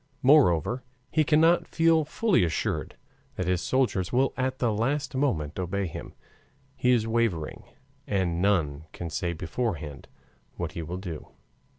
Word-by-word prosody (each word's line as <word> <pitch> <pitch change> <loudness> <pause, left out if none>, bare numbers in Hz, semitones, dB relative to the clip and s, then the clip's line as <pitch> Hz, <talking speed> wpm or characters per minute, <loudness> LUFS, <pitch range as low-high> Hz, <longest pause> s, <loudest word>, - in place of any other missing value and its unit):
Moreover, 125 - +4 0.3
he 155 - +3
cannot 160 +3 +4
feel 165 -1 +3
fully 195 - +2
assured 80 -2 -2 0.4
that 90 - -2
his 90 0 +1
soldiers 120 -9 0
will 130 +2 +2
at 130 0 -1
the 120 -4 +1
last 135 +7 -1
moment 95 - -1
obey 95 +2 -1
him. 85 - -7 0.6
He 125 - +1
is 120 -3 +4
wavering, 115 -9 -1 0.4
and 90 -4 0
none 80 -7 +1
can 85 -2 -6
say 85 +1 -1
beforehand 80 - -4 0.5
what - - -4
he 85 - -5
will 85 +3 -5
do. 90 -5 -7
100 Hz, 145 wpm, -27 LUFS, 85-130 Hz, 0.6 s, Moreover